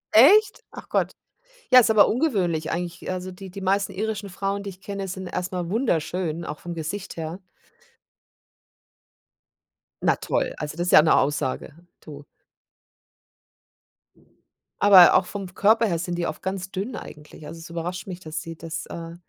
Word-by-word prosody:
Echt? 395 - +6
Ach - - -12
Gott, - - 0 0.6
ja, 255 - +10
ist 225 - +4
aber 215 -2 +6
ungewöhnlich 190 - 0
eigentlich. 175 +1 -4
Also 185 0 -5
die 190 +1 -10
die 195 +2 -8
meisten 195 +1 +1
irischen 205 0 -3
Frauen, 195 +2 -3
die 200 - -5
ich 185 - -17
kenne, 200 -1 -5
sind 185 0 -6
erst 180 +1 -4
mal 175 -2 -3
wunderschön, 170 - -1
auch 150 - -5
vom 175 - -7
Gesicht 170 +5 -5
her. 165 +2 -5 2.6
Na - - +3
toll, - - -2
also 150 0 -5
das 175 +1 -2
ist - - +1
ja - - +9
'ne 160 - +4
Aussage, 140 0 -1 0.3
du. 145 -2 -11 2.6
Aber 195 -3 +9
auch - - +4
vom 190 -2 -7
Körper 220 +3 +4
her 170 -4 -1
sind 175 -1 -3
die 170 -1 -1
oft 155 - -6
ganz 190 0 -4
dünn 205 +6 -4
eigentlich. 150 -3 -11
Also 165 - -9
es 165 - -11
überrascht 175 +3 -5
mich, 180 -2 -6
dass 160 -2 -6
sie 165 0 -8
das, 165 0 -6
äh 165 0 -8
180 Hz, 165 wpm, -24 LUFS, 165-200 Hz, 2.6 s, ja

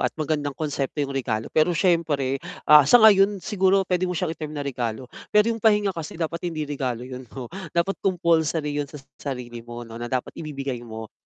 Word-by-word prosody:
at - - +2
magandang 145 -2 -2
konsepto 145 -1 -2
yung 140 - -5
regalo 115 -5 -2
pero 160 +2 +3
syempre, 150 -7 +1 0.2
ah, 150 -2 +7
sa - - +9
ngayon 200 -1 +6
siguro 190 0 +2
pwede 185 0 0
mo 180 - -2
siyang 175 -2 -1
i-term 155 -2 -7
na 145 - -3
regalo. 125 -3 -3 0.2
Pero 210 +2 +4
yung 225 - -6
pahinga 210 -2 +3
kasi 165 -1 -7
dapat 170 +1 -3
hindi 155 -2 -3
regalo 130 -5 -3
yun 130 -1 -9
'no, 130 +2 -8 0.2
dapat 180 +3 0
compulsory 160 -5 +1
yun 145 - -4
sa 150 - -10 0.2
sarili 125 -4 -5
mo 120 +1 -8
'no, 115 0 -10
na 120 - -4
dapat 130 0 -2
ibibigay 140 -5 -4
mo. 110 -2 -9
150 Hz, 195 wpm, -24 LUFS, 130-175 Hz, 0.2 s, sa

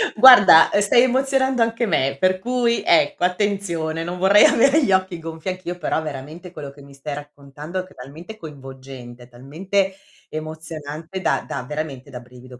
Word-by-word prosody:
Guarda, 210 -9 +8
ehm, 205 - +2
stai 240 +4 +4
emozionando 265 0 0
anche 230 +1 0
me, 135 -7 -1
per 185 0 +1
cui 240 +1 -1
ecco 170 +1 +2
attenzione, 180 -4 -2
non 175 +1 -6
vorrei 195 +3 +5
avere 275 +5 +3
gli 195 - 0
occhi 185 -2 0
gonfi 160 +2 -7
anch'io, 180 -1 -6
però 160 - -2
veramente, 155 +4 -9
quello 145 -5 -9
che 140 0 -17
mi 140 0 -16
stai 140 +1 -7
raccontando 145 +4 -9
è - - -4
che - - -20
è - - -33
talmente 160 +12 -12
coinvolgente, 130 - -12
talmente 185 +11 -3 0.4
emozionante 155 +2 -8
da - - -1
da 125 - -5
veramente 145 -1 -7
da 125 -2 -9
brivido, 125 0 -15
165 Hz, 170 wpm, -20 LUFS, 140-195 Hz, 0.4 s, Guarda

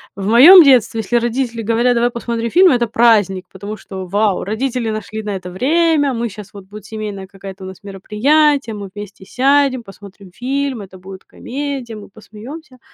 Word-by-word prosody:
в 195 - -6
моем 305 - +9
детстве, 250 -5 +3
если 240 +3 -1
родители 235 0 -2
говорят: 230 +3 +1
"Давай 240 0 +1
посмотрим 235 -1 -4
фильм"- 365 +6 +5
это 240 -2 +1
праздник, 210 -5 +2
потому 205 +3 -8
что 190 -2 -9
вау, 205 +1 0
родители 235 +3 -3
нашли 215 0 -5
на 210 -2 -5
это 180 -1 -8
время, 290 - +1
мы 235 0 -3
щас 205 0 -11
вот, 200 -2 -12
будет 205 +1 -12
семейное 210 -3 -7
какая-то 195 0 -11
у - - -7
нас 190 +1 -12
мероприятие, 240 +7 +1
мы 200 -2 -8
вместе 205 -2 -10
сядем, 270 +1 +1
посмотрим 195 -1 -14
фильм, 265 0 -3
это 190 -1 -12
будет 190 +1 -12
комедия, 270 -3 -6
мы 210 -1 -11
посмеемся. 250 - -12
225 Hz, 175 wpm, -17 LUFS, 200-255 Hz, -, моем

